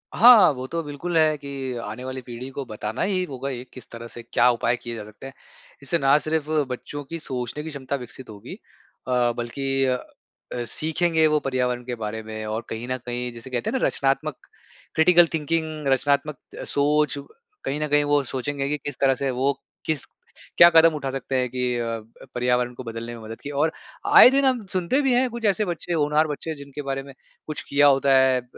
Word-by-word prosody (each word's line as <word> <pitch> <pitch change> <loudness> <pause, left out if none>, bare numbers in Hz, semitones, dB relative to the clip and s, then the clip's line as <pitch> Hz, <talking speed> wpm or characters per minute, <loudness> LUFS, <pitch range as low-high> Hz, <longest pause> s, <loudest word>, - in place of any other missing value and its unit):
हाँ, 235 -6 +8
वो 130 -1 -6
तो 165 +4 -2
बिल्कुल 155 +4 -3
है। 155 -1 +4
कि 135 -2 -5
आने 110 +4 -6
वाली 130 0 -5
पीढ़ी 125 +1 -8
को 140 +1 -5
बताना 110 0 -5
ही 185 -1 +1
होगा 135 0 -4
ये 125 -2 -5
किस 130 - -12
तरह 115 0 -8
से 120 0 -10
क्या 120 +1 +3
उपाय 120 0 0
किए 120 -1 -7
जा 110 - -6
सकते 105 +5 -11
हैं। 135 - -11 0.5
इससे 140 +5 0
ना 140 -2 +4
सिर्फ 155 0 -2 0.2
बच्चों 145 +3 -6
की 165 +4 -6
सोचने 130 0 -4
की 160 - -6
क्षमता 140 -2 -4
विकसित 125 -1 -9
होगी 105 -2 -9 0.5
अ, 125 -1 +2
बल्कि 135 +3 -1
अ, 130 -1 +1 0.7
सीखेंगे 160 +4 +1
वो 150 0 +2
पर्यावरण 125 -3 -1
के 125 -1 -3
बारे 110 -1 -4
में। 110 0 -6
और 110 +2 -3
कहीं 115 +2 -5
न 130 - 0
कहीं 125 0 -3
जिसे 115 +2 -10
कहते 120 -2 -2
हैं 265 - -1
ना - - +2
रचनात्मक 135 +1 0 0.6
क्रिटिकल 175 +1 +6
थिंकिंग, 155 -1 -2
रचनात्मक 140 +2 +1 0.2
अ, - - -5
सोच 150 +1 +1 0.5
कहीं 145 - -2
न 150 - 0
कहीं 145 0 +3
वो 145 -1 +2
सोचेंगे 135 +2 -3
कि 150 - 0
किस 145 -1 -6
तरह 135 -1 +4
से 135 0 -2
वो 130 +3 +1 0.3
किस 155 -4 -2 0.5
क्या 170 - +10
कदम 165 -1 +6
उठा 140 -3 -3
सकते 135 0 -4
हैं 125 - 0
कि 125 +1 -3
अ, 115 -1 -2 0.4
पर्यावरण 125 0 +1
को 125 - -8
बदलने 115 0 -6
में 115 - -11
मदद 110 +1 -9
की। 145 - -6
और 145 +3 +1 0.4
आए - - +9
दिन 275 +1 +2
हम 250 -5 +1
सुनते 185 +8 +1
भी 270 -3 +2
हैं 250 +1 +3
कुछ 235 -1 -5
ऐसे 210 +1 +2
बच्चे 175 -1 -3
होनहार 150 0 +2
बच्चे 155 +2 -4
जिनके 140 0 -8
बारे 135 0 -2
में 140 0 -12 0.3
कुछ 155 -1 -4
किया 145 +1 +5
होता 135 0 +4
है 130 -1 +4
अ, - - -22
135 Hz, 210 wpm, -24 LUFS, 125-155 Hz, 0.7 s, क्या